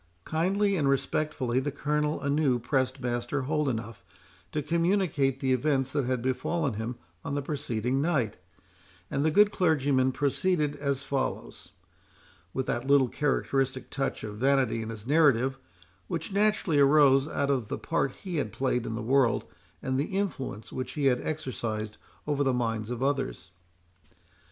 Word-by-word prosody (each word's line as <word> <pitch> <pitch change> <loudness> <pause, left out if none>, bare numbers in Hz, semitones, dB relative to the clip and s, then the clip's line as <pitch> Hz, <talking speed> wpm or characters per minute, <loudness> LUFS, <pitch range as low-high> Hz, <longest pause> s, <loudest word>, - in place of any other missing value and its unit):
Kindly 195 +5 +1
and 140 -4 +2
respectfully 135 -2 0
the 140 +2 -1
Colonel 150 +1 -1
anew 140 -2 +2
pressed 130 +2 -1
Master 120 +3 -1
Holdenough 130 -7 -1 0.5
to 150 - -2
communicate 165 -5 +1
the 130 -1 +1
events 135 0 +1
that 140 -2 0
had 125 -1 -1
befallen 140 +2 0
him 110 +3 -4 0.3
on 140 - -3
the 145 - 0
preceding 130 -3 -1
night; 140 -10 0 0.7
and 140 - 0
the 160 - +3
good 205 +6 +5
clergyman 140 -8 +2
proceeded 145 +3 0
as 140 -1 -1
follows, 135 -1 -3 0.8
with 130 +4 -2
that 120 +3 -2
little 140 -3 +5
characteristic 135 -2 -1
touch 135 -1 -2
of 105 -1 -6
vanity 130 -2 +2
in 110 - -5
his 110 -1 -7
narrative, 135 -3 +3 0.5
which 165 +3 -4
naturally 205 -7 +2
arose 140 -1 +5
out 140 -2 0
of 125 -6 0
the - - -3
part 165 -5 0
he 180 -4 -3
had 110 -8 -1
played 125 -3 -1
in 110 - -3
the 110 - -4
world, 130 -1 +3 0.4
and 130 0 0
the 160 +7 -1
influence 135 - -3
which 130 - -4
he 145 -2 -1
had 125 -2 +3
exercised 115 -8 -3 0.3
over 145 -1 +1
the 135 -2 +2
minds 115 -2 -1
of 125 +1 -3
others. 115 - -2
135 Hz, 155 wpm, -28 LUFS, 125-150 Hz, 0.8 s, good